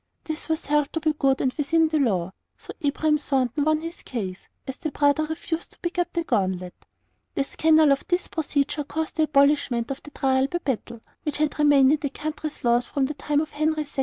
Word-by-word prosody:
This 315 0 -5
was 320 -1 -1
held 295 0 +1
to 325 - 0
be 310 0 +1
good 275 -3 +1
and 255 - +1
within 320 +2 +2
the 310 -1 +1
law, 190 -9 +1 0.3
so - - -10
Abraham 300 +1 +1
Thornton 270 -1 0
won 310 +1 +2
his 330 +1 -7
case, 200 -6 -5 0.2
as 265 - -6
the 310 - -3
brother 290 +1 +2
refused 325 +1 -4
to - - -19
pick 350 +1 -3
up 350 - 0
the 340 - -1
gauntlet. 185 - -1 0.6
The - - +1
scandal 315 +1 +4
of 275 - +2
this 355 0 0
procedure 295 -2 -1
caused 315 +3 -4
the 315 - +4
abolishment 280 -5 +2
of 275 - -5
the - - -12
trial 265 -2 +1
by 345 - -2
battle, 235 -7 -4 0.2
which 300 -2 -3
had 305 0 -1
remained 285 -2 +6
in 305 - +2
the 285 - -2
country's 305 +1 -5
laws 240 0 +2
from 275 -2 0
the 290 - -3
time 295 0 0
of 310 - -5
Henry 310 +1 0
II. 285 -1 -9
295 Hz, 220 wpm, -25 LUFS, 270-310 Hz, 0.6 s, remained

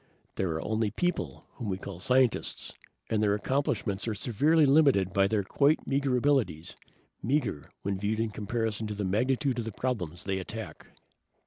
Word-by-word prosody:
There 95 - -1
are 80 - -4
only 110 0 0
people, 175 - -2
whom 115 -5 -6
we 95 - -1
call 95 -2 -8
scientists, 125 +4 +1 0.4
and 110 -1 +2
their 105 -1 +3
accomplishments 110 -4 -1
are 110 - -1
severely 145 +9 +3
limited 135 - +4
by 100 0 +4
their 105 0 0
quite 145 +9 +2
meager 135 -2 +1
abilities. 125 - +1 0.5
Meager, 125 - -1
when 100 -1 -2
viewed 105 +2 -1
in 115 0 0
comparison 110 +1 -2
with 105 -1 -5
the 105 - -1
magnitude 125 +6 +1
of 115 - -3
the 115 - -4
problems 90 -8 -3
they 95 -1 -1
attack." 110 +4 -7
110 Hz, 165 wpm, -29 LUFS, 100-130 Hz, 0.5 s, limited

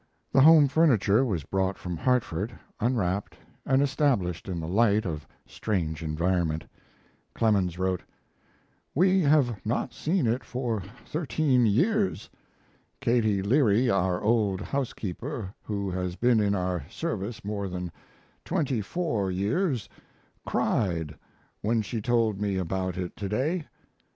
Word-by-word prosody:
The 135 - +5
home 155 0 +8
furniture 130 - +4
was 95 - -1
brought 95 +3 -1
from 90 -1 -5
Hartford, 110 0 0 0.2
unwrapped, 105 -5 -1 0.3
and 135 +1 +4
established 125 - 0
in 90 -2 -3
the 80 - -4
light 105 +2 +3
of 75 -4 -4 0.2
strange 80 -7 -2
environment. 80 0 0 0.7
Clemens 100 -6 +2
wrote: 95 -1 0 0.9
We 185 +4 +4
have 140 - +2
not 110 +3 -1
seen 165 -2 0
it 120 +3 0
for 120 -4 -2 0.2
thirteen 145 -6 +1
years. 190 - +1 0.7
Katie 110 -5 +2
Leary, 120 0 +3
our 90 -2 +1
old 105 -4 +2
housekeeper, 120 - -4
who 100 -2 -3
has 90 -1 -3
been 120 +1 +3
in 100 -1 +2
our 90 -4 -1
service 115 - -4
more 100 -2 -3
than 90 -1 -5 0.5
twenty 130 -7 0
four 110 - -1
years, 105 - 0 0.6
cried 80 -6 0 0.5
when 110 +1 +1
she 110 +2 -4
told 115 -3 +1
me 100 -2 0
about 95 0 -2
it 90 -1 -4
to 100 -2 -4
day. 150 - -1
105 Hz, 125 wpm, -27 LUFS, 95-130 Hz, 0.9 s, home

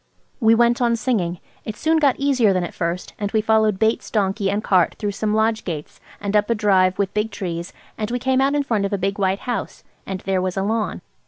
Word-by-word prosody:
We 225 -2 +5
went 235 +1 +3
on 235 -1 +3
singing. 200 -8 -1 0.2
It 215 - -5
soon 320 +5 +2
got 280 -4 +3
easier 260 -7 +3
than 185 -1 0
at 175 - -5
first, 170 +1 -3
and 205 -1 -2
we 220 - +3
followed 220 -2 +2
Bates's 220 +2 0
donkey 195 -1 0
and 205 +2 -1
cart 185 -3 +3
through 205 -2 -2
some 210 +1 -1
lodge 220 0 +1
gates 155 -5 -6 0.2
and 200 0 -2
up 210 +1 +3
a 230 - +2
drive 190 -3 +3
with 200 -1 -1
big 210 +1 0
trees, 175 -4 -5 0.3
and 215 0 -2
we 245 - -1
came 260 +1 +1
out 275 +2 +2
in 290 - +1
front 225 -7 0
of 200 - -3
a - - +1
big 195 +1 -2
white 190 0 +1
house, 245 -1 -4 0.2
and 190 -1 -4
there 190 -1 0
was 185 0 -2
a 195 - +1
lawn. 215 +1 -1
210 Hz, 240 wpm, -21 LUFS, 190-230 Hz, 0.3 s, We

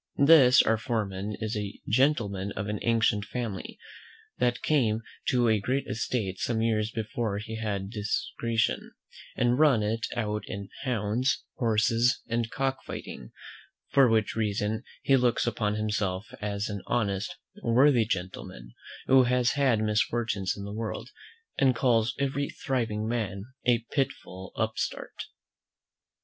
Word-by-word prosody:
This 140 -5 +8
our 115 -1 +2
foreman 105 -4 -2
is 110 +1 -2
a 105 -1 -4
gentleman 105 -6 +1
of 100 - -4
an 105 0 -2
ancient 115 -3 +2
family, 110 -3 -5 0.6
that 120 -1 +1
came 115 -7 +2 0.2
to 125 -2 +3
a 110 -1 +3
great 130 +7 -1
estate 105 -3 -2
some 115 -2 0
years 110 -1 +1
before 110 -1 -3
he 110 +2 -5
had 100 -3 -3
discretion, 115 +1 -1 0.4
and 120 +2 +2
run 140 -8 +5
it 115 +2 -1
out 105 -3 -1
in 100 -2 -6 0.2
hounds, 120 +2 0
horses, 115 +2 +2
and 115 0 -1
cock 135 +1 -1
fighting; - - -8 0.6
for 135 -3 +6
which 110 -1 +1
reason 105 0 -1 0.2
he 135 - +4
looks 125 -2 +2
upon 105 -3 0
himself 105 -2 -1 0.2
as 105 0 -2
an 100 -2 -4
honest, 110 - -1 0.2
worthy 125 - +4
gentleman, 90 - -5 0.3
who 130 -1 +6
has 125 0 +2
had 130 -6 +2
misfortunes 105 -2 0
in 100 - -6
the 100 0 -6
world, 115 +3 -5 0.5
and 130 -2 +4
calls 120 -2 +2
every 140 +1 -1
thriving 110 -5 -2
man 105 -4 -2 0.2
a 120 -2 +3
pitiful 95 -9 -3
upstart. 110 0 -3
110 Hz, 135 wpm, -28 LUFS, 105-125 Hz, 0.6 s, This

